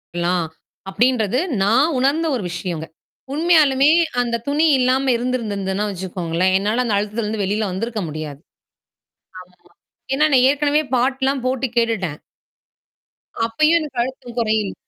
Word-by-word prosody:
கலாம். 175 -1 0 0.4
அப்டின்றது 240 +1 +1 0.2
நான் 260 +10 +3
உணர்ந்த 285 +6 +1
ஒரு 235 - -3
விஷயங்க. 175 -2 -4 0.5
உண்மையாலுமே 300 -3 +4 0.3
அந்த 235 -1 -1
துணி 295 +3 +2
இல்லாம 255 +2 +2
இருந்திருந்திருதுன்னா 210 -5 -2
வச்சுக்கோங்களேன். 180 -1 -1
என்னால 210 +6 0
அந்த 220 -4 0
அழுத்தத்திலருந்து 210 +1 -2
வெளில 205 +2 -1
வந்திருக்க 220 +3 -3
முடியாது. 150 -2 -6 1.0
ஆமா. 180 0 -20 0.6
ஏன்னா 300 +3 +3
நான் 255 -1 +5
ஏற்கனவே 290 +1 +2
பாட்டுலாம் 265 +1 0
போட்டு 260 0 -1
கேட்டுட்டேன். 205 -10 0 1.2
அப்பயும் 305 +9 +3
எனக்கு 295 -6 -6
அழுத்தம் 250 -1 -8
குறையில் 215 -3 0
230 Hz, 115 wpm, -20 LUFS, 195-265 Hz, 1.2 s, நான்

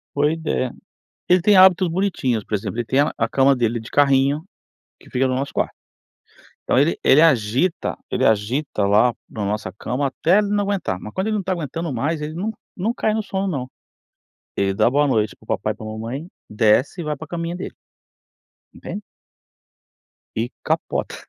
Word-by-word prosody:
Boa 145 +1 +3
ideia. 160 -6 -1 0.6
Ele 180 0 +5
tem 205 +2 +5
hábitos 185 -1 +6
bonitinhos, 160 - -1
por - - -8
exemplo, 105 +1 -2
ele 120 - -1
tem 130 +4 +2
a 145 - +1
a 115 - +1
cama 135 +3 +4
dele 120 -2 0
de 115 - -11
carrinho, 140 +2 +3 0.6
que - - -17
fica 130 +1 +1
no 130 - 0
nosso 135 +2 -2
quarto. - - -1 0.9
Então - - +1
ele 145 +4 +2
ele 140 +4 +6
agita 135 - +2
ele - - 0
agita 110 +2 +1
lá 110 +4 +4 0.2
na 105 -2 -4
nossa 100 -1 -2
cama 125 +8 -2
até 165 +8 +2
ele 210 - 0
não 205 0 +1
aguentar, 195 - -2
mas 105 - -9
quando 190 +3 -1
ele 220 - 0
não 205 - -1
tá 185 - -2
aguentando 165 -2 -3
mais 150 +6 -1
ele 150 +1 -4
não-não 205 +2 -4
cai 215 -2 0
no 220 - 0
sono 195 -1 -3
não. 135 -9 -2 0.9
Ele 95 -1 +1
dá 110 - +3
boa 145 +3 +3
noite 110 -6 0
para - - -22
o - - -22
papai - - -1
e - - -15
pra 110 - -9
mamãe 115 +8 -5 0.2
desce, 110 - +2
e - - -4
vai 150 -1 -2
pra 160 - -9
caminha 170 0 -3
dele. 180 - -6 1.0
Entende? 205 - -7 1.3
E 115 +2 -1
capota. - - -1
140 Hz, 190 wpm, -21 LUFS, 115-175 Hz, 1.3 s, hábitos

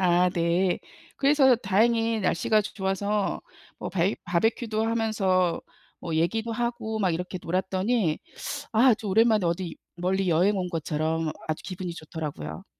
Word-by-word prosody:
아, 180 0 +4
네. 175 +2 +1 0.4
그래서 275 -2 +5
다행히 225 +2 +2
날씨가 210 +3 +2
조 - - -7
좋아서 200 +1 -1 0.4
뭐 - - -5
바이 185 +2 +1
바비큐도 220 +5 0
하면서 200 -6 +1 0.4
뭐 165 - -4
얘기도 220 +8 0
하고 235 -2 -2
막 190 -4 +2
이렇게 180 +2 -4
놀았더니 190 +1 0 0.6
아 220 - +2
아주 220 -2 +1
오랜만에 215 -1 +4
어디 170 0 -2 0.2
멀리 185 +1 0
여행 180 +6 +3
온 180 -1 -2
것처럼 160 -1 -1 0.2
아주 155 - -3
기분이 180 -2 -5
좋더라고요. 150 - -6
190 Hz, 310 characters per minute, -26 LUFS, 170-220 Hz, 0.6 s, 그래서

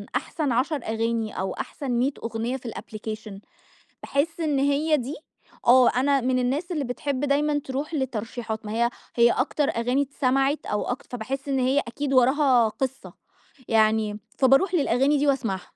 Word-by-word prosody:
أحسن 295 -5 -1
10 265 +7 +1
أغاني 225 -1 -1
أو 190 0 -2
أحسن 275 -3 -5
100 250 +4 +2
أغنية 230 +3 -2
في 245 -2 -7
الapplication 215 -1 -7 0.7
باحس 325 +4 -1
إن 300 -4 +1
هي 290 +3 +2
دي 265 +4 -4 0.5
آه، 250 0 +7
أنا 275 +1 +2
من 255 +1 +1
الناس 285 +9 -1
اللي 300 -4 -1
بتحب 255 +2 -3
دايمًا 290 +1 +1
ترُوح 280 +5 -4
لترشيحات. 230 -4 -3
ما 210 - -5
هي 235 +1 +2 0.3
هي 235 0 +5
أكتر 285 +2 0
أغاني 245 +4 0
اتسمعت 275 +1 0
أو 210 - -1
أكتر 245 - -4
فباحس 270 +5 -5
إن 270 -1 +1
هي 260 +3 +2
أكيد 275 +2 -3
وراها 255 -2 +4
قصة، 265 +3 -5 0.5
يعني 215 -1 +2 0.2
فبارُوح 275 +8 +4
للأغاني 275 0 +2
دي 290 +1 +1
وأسمعها. 225 -9 0
260 Hz, 155 wpm, -25 LUFS, 230-280 Hz, 0.7 s, آه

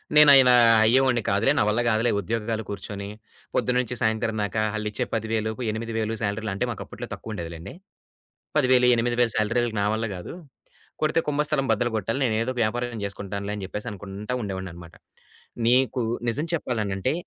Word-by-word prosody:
నేను 150 -1 +9
అయిన 130 -2 +7 0.4
అయ్యేవాడిని 125 0 +3
కాదులే, 105 +7 +3
నా - - +4
వల్ల 110 +3 +1
కాదులే. 115 +2 +2
ఉద్యోగాలు, 110 +2 -2
కూర్చొని 100 0 -6 0.5
పొద్దున్న 125 0 +1
నుంచి 125 0 -5
సాయంత్రం 110 0 0
దాకా 105 +2 -1
వాళ్లీచ్చే 105 -1 -2
10000 110 0 -1 0.2
8000 115 0 -3
శాలరీలు 105 0 -2
అంటే, - - 0
మాకు - - -6
అప్పట్లో - - -8
తక్కువ 110 - -7
ఉండేది 85 -4 -5
లెండి. 80 - -9 0.8
10000, 130 -3 +4
8000 120 0 +1
శాలరీ 115 +3 +1 0.2
నా - - +1
వల్ల 110 +1 -1
కాదు. 90 - -8 0.7
కొడితే 155 +2 +2
కుంభస్థలం 150 -1 +1
బద్దలు 120 +2 0
కొట్టాలి. 115 +5 -2
నేనేదో 115 +1 0
ఒక - - -8
వ్యాపారం 120 +1 -2
చేసుకుంటానులే 100 +1 -4
అని 100 - -6
చెప్పేసి 105 +5 -6
అనుకుంటా 100 +3 -7
ఉండేవాడిని 95 -3 -4
అన్నమాట. 85 -1 -12 0.7
నీకు 130 +1 +3 0.3
నిజం 145 +8 -1
చెప్పాలనంటే 110 - -1
110 Hz, 155 wpm, -25 LUFS, 105-125 Hz, 0.8 s, నేను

